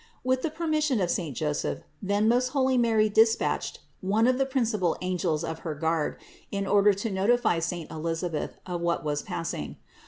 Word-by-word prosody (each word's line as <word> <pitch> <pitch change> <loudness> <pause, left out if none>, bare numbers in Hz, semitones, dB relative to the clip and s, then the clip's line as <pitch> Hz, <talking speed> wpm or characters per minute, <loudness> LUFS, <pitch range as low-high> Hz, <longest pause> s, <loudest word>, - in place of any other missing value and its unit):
With 255 0 +1
the 325 - -1
permission 310 -5 0
of 180 -3 +1
saint 155 -8 -2
Joseph, 150 -1 -1 0.2
then 205 +2 +1
most 245 +2 +3
holy 260 -1 +3
Mary 225 -3 +3
despatched 225 +2 +2 0.2
one 210 +4 +2
of 255 +1 +3
the 270 - +2
principal 225 - 0
angels 180 -3 -1
of 160 -1 -4
her 160 -3 -4
guard, 160 0 0 0.3
in 200 -1 -2
order 205 +1 +5
to 205 +3 -3
notify 200 -1 +2
saint 170 0 -4
Elisabeth 165 0 -3
of 175 -2 -4
what 170 -1 0
was 150 -1 -1
passing. 165 - -4
195 Hz, 175 wpm, -27 LUFS, 165-235 Hz, 0.3 s, order